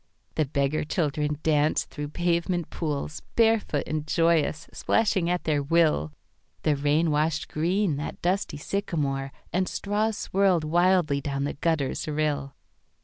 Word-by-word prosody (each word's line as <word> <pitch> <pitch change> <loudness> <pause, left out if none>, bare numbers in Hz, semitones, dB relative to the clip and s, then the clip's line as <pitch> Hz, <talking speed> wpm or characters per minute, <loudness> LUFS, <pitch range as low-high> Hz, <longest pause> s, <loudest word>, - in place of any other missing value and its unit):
The 155 - +1
beggar 140 +2 0
children 150 -2 -1
danced 150 -1 +2
through 145 -1 -5
pavement 170 +1 -1
poolsBarefoot 160 +4 0
and 155 0 -3
joyous, 165 -1 +2
splashing 195 -6 +1
at 180 0 0
their 150 -2 +1
will; 150 - +2 0.5
The 150 - +3
rain 150 +3 +2
washed 155 +1 0
green 175 +1 0
that 145 - -5
dusty 180 -3 -1
sycamoreAnd 150 0 -2
straws 210 +1 -1
swirled 190 -4 +2
wildly 170 -2 +2
down 140 0 -2
the 145 - -2
gutter's 155 -3 -1
rill. 145 -2 -1
155 Hz, 125 wpm, -26 LUFS, 145-175 Hz, 0.5 s, The